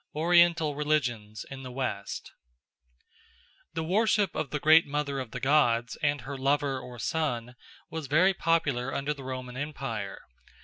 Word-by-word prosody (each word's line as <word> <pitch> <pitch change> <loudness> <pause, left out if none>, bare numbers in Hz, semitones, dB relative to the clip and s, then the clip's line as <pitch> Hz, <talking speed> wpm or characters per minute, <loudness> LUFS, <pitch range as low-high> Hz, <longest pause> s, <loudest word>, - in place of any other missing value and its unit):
Oriental 170 -1 +4
Religions 125 -8 -1
in 135 -1 -7
the 130 -1 -7
West 125 -6 -4 1.4
THE 160 - -1
WORSHIP 205 +2 +2
of 140 - -3
the 150 - -2
Great 155 +2 +6
Mother 145 -1 -2
of 130 -3 -5
the - - -6
Gods 125 -4 +2
and 145 -2 +1
her 135 +3 -6
lover 140 0 +1
or 125 -1 -10
son 125 -2 -2 0.4
was 160 -3 -4
very 175 +8 +4
popular 145 -8 +1
under 140 +2 -1
the 140 -2 -10
Roman 130 -1 -6
Empire. 130 -8 -4
140 Hz, 145 wpm, -28 LUFS, 125-155 Hz, 1.4 s, Great